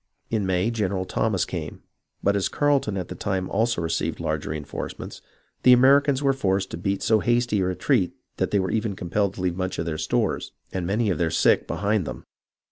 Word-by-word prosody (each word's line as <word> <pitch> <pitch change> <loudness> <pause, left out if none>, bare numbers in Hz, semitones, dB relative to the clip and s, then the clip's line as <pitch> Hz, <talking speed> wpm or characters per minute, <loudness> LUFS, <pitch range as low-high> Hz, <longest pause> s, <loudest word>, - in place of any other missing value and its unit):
In 105 -4 0
May, 95 +4 +1
General 100 -4 -1
Thomas - - 0
came, - - -6 0.4
but 100 +1 +3
as 100 - +1
Carleton 140 -9 +1
at 90 - -4
the - - -4
time 95 -2 -2
also 110 -3 +1
received 80 - -1
large 80 -1 -2
reenforcements, 75 -2 -6 0.4
the 125 - +7
Americans 140 +2 +5
were 135 -1 +4
forced 95 -6 0
to - - -4
beat 100 +3 -2
so 110 -1 +4
hasty 120 -1 +1
a 95 - +1
retreat 95 - +1 0.2
that - - 0
they 105 - +1
were 95 -2 0
even 110 -2 -1
compelled 95 +2 -1
to - - -6
leave 90 -2 0
much 95 0 -3
of 85 - -2
their 80 -2 -3
stores - - -1 0.2
and 90 -2 -2
many 105 +2 +1
of 90 - -2
their 85 -2 +2
sick - - +3
behind 100 -3 0
them. - - -6
100 Hz, 205 wpm, -24 LUFS, 90-115 Hz, 0.4 s, the